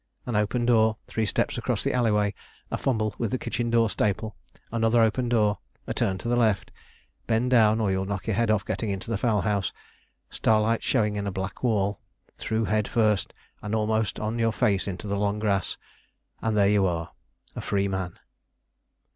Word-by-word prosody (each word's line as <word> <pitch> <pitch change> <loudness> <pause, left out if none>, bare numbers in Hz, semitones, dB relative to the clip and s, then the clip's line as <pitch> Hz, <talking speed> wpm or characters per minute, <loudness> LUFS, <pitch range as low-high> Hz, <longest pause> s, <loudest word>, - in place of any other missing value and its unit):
An 120 - -3
open 105 +4 +1
door, 110 -2 +4
three 110 -1 -1
steps - - 0
across - - -1
the - - 0
alley 120 -2 +2
way, 105 -1 +2 0.4
a - - 0
fumble 110 -5 0
with 115 - 0
the 130 - -1
kitchen 120 -1 -2
door 115 -1 +4
staple; 105 0 -1 0.4
another 115 0 +2
open 115 +2 +2
door, 105 -4 +2 0.3
a - - -3
turn 95 -1 0
to 105 - -6
the 120 - +2
left, 110 -6 +1 0.6
bend 120 +2 +1
down 110 -3 +5
or 105 -3 +1
you'll 95 0 0
knock 100 -2 -3
your 110 - 0
head 115 +1 +1
off 105 -2 +2
getting 110 - -2
into 100 +4 -4
the 115 - +1
fowl 110 -4 +2
house, 100 -3 0 0.6
starlight 110 +1 +2
showing 105 -1 +1
in 100 0 -2
a - - -1
black 95 0 -5
wall, 105 -4 +1 0.4
through 110 0 -1
head 105 -1 +1
first 110 -3 +1 0.3
and 105 +1 -2
almost 110 -1 0
on 110 +2 -2
your 115 0 +2
face 105 -5 +1
into 100 +3 -5
long 100 +1 0
grass, 100 -4 0 0.6
and 110 -1 0
there 100 -1 +5
you 100 -2 +3
are 85 -2 -3 0.4
a - - -4
free 100 -1 0
man. 95 -2 -3
110 Hz, 190 wpm, -26 LUFS, 100-115 Hz, 0.6 s, down